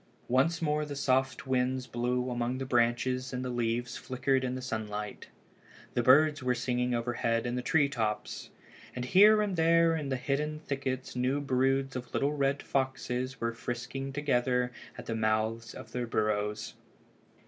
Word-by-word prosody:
Once 165 +8 +2
more 150 -1 +1
the 145 -1 -5
soft 130 -1 +1
winds 130 0 0
blew 125 +1 -1
among 120 +1 -1
the 135 - -3
branches 125 +1 +1
and 130 0 -3
the 125 - -2
leaves 120 0 -1
flickered 130 +1 0
in 130 0 -1
the - - -4
sunlight. 105 -3 -4 0.7
The 120 - +1
birds 145 +4 +5
were 125 -1 +1
singing 125 0 0
overhead 115 -1 0
in 120 - -2
the 125 - -1
tree 145 +3 +3
tops. 110 -6 -3 0.5
And 125 0 -3
here 210 +8 +6
and 200 -3 -2
there 165 0 +4
in 150 -3 -3
the 130 - 0
hidden 150 +4 -1
thickets 135 -4 -4
new 130 +3 +1
broods 135 0 +1
of 125 -2 -6
little 140 +2 +1
red 140 -1 0
foxes 130 -1 -2
were 115 0 -1
frisking 125 +3 -5
together 125 -3 +1 0.3
at 125 - -8
the 115 - -3
mouths 110 +1 0
of 110 - -10
the 125 -1 -3
burrows. 105 -1 -1
130 Hz, 165 wpm, -30 LUFS, 120-135 Hz, 0.7 s, here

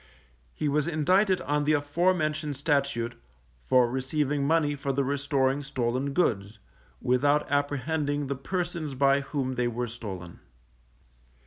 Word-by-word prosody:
He 150 - -1
was 150 +2 +1
indicted 185 +5 +2
on 145 0 0
the 150 +1 +2
afore 155 +6 +2
mentioned 155 -2 -2
Statute, 140 -5 0 0.5
for 125 - +4
receiving 140 +3 -1
money 155 -2 +2
for 140 -1 -2
the 140 +1 0
restoring 140 0 0
stolen 130 0 -2
goods, 110 - 0 0.4
without 145 +4 +2
apprehending 145 +1 0
the 140 +1 -2
persons 170 0 -3
by 140 +1 +3
whom 135 -2 -3
they 125 -1 0
were 120 +1 -2
stolen. 100 -7 -7
140 Hz, 130 wpm, -27 LUFS, 130-150 Hz, 0.5 s, for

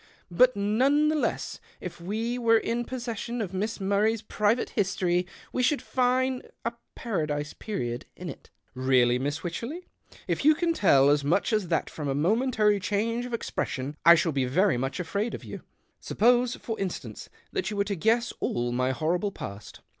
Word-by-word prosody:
But 255 +8 +5
none 260 +9 +3
the 310 - +1
less 300 - -2 0.2
if - - -8
we 225 +7 -2
were 230 -1 +5
in 235 +2 -1
pos 255 -1 -5
session 235 +1 -4
of 195 -4 -3
Miss 210 +4 -2
Murray's 205 +3 +1
private 210 +2 0
history, 180 -3 0 0.3
we 255 - 0
should 265 +3 +2
fine 255 0 +1 0.2
a 230 - -1 0.2
paradise 150 -9 -2
period 120 - -4
in - - -8
it." - - -9 0.2
" - - -41 0.2
Really, 125 -1 +4
Miss 145 +4 -3
Wycherley? 235 - -5 0.4
If - - -1
you 310 +2 +6
can 335 +1 +1
tell 140 - +5
as 145 -1 +2
much 175 +10 +1
as 215 -4 +1
that 165 -2 0
from 150 -2 -5
a 135 - 0
momentary 210 - +2
change 225 +5 -1
of 245 - -9
expression, 140 - -3
I 170 +1 +9
shall 165 0 +1
be 135 -3 0
very 180 +8 +2
much 135 +7 -2
afraid 200 +6 -2
of - - -9
you. - - -8 0.4
Suppose, 245 +2 +2
for 225 -2 -5
instance, 195 -2 -5 0.2
that 380 -2 -2
you 210 - -4
were 200 - +3
to 200 0 -3
guess 230 +6 +1
all 120 0 -1
my 125 +1 +1
horrible 170 +9 0
past." 100 - -9
205 Hz, 185 wpm, -27 LUFS, 160-240 Hz, 0.4 s, I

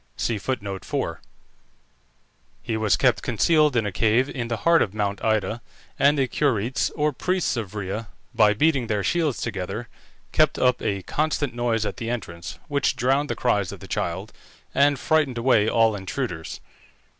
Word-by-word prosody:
He 110 -4 -1 2.3
was 105 -4 +2
kept 125 +2 +3
concealed 150 +6 +3
in 115 -3 +2
a 105 - -2
cave 115 +6 +2
in 120 -3 -4
the 115 -1 -2
heart 170 +5 +4
of 100 - -1
Mount 100 -1 -2
Ida, 110 +1 0 0.4
and 145 +2 +4
the 135 -2 +2
Curetes, 125 -3 0
or 150 -1 +1
priests 180 +4 0
of 110 -4 -5
Rhea, 105 +2 -4 0.3
by 105 -3 +4
beating 140 -1 +2
their 105 -3 -1
shields 160 - 0
together, 110 +2 -4 0.4
kept 155 -1 +3
up 125 -1 +2
a 100 -3 -2
constant 150 - -1
noise 120 -2 0
at - - -4
the 115 -2 -4
entrance, 85 -8 -5
which 140 -1 +1
drowned 135 +3 +1
the - - -1
cries 100 -7 0
of - - -9
the - - -11
child 95 +5 -3 0.4
and 140 0 +4
frightened 150 -4 +1
away 115 -3 +3
all 115 -2 +3
intruders. 95 -3 -5
115 Hz, 155 wpm, -24 LUFS, 105-140 Hz, 2.3 s, heart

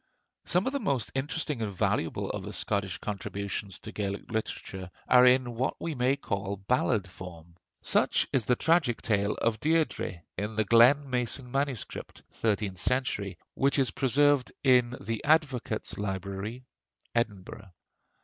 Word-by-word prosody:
Some 180 +2 +2
of 265 - -1
the 280 - 0
most 140 - 0
interesting 145 -1 -2
and 105 -2 -2
valuable 95 - -1
of - - -4
the - - -7
Scottish 100 -1 -1
contributions 100 -1 -4
to - - -8
Gaelic 100 0 -4
literature 95 -4 -4 0.2
are 125 0 +7
in 125 -1 +4
what 125 +3 -1
we 165 - -3
may 130 0 +2
call 100 -7 -3
ballad 105 0 +1
form. 85 -2 -11 0.3
Such - - +2
is 125 -5 +2
the 125 - +3
tragic 160 -5 +2
tale 100 -2 +1
of 115 -2 0
'Deirdrê,' 150 - 0 0.2
in 105 +2 -3
the 110 0 +1
Glen 125 +7 +6
mason 125 0 -1
MS. 135 -5 0 0.5
(thirteenth 105 -4 -1
century), 105 -8 0 0.2
which 140 +2 +2
is 135 -3 +2
preserved 140 0 +3
in 125 -2 +4
the 115 +2 -4
Advocates' 145 -10 +1
Library, 100 +5 -4 0.5
Edinburgh. 105 -3 -3
115 Hz, 145 wpm, -29 LUFS, 100-135 Hz, 0.5 s, are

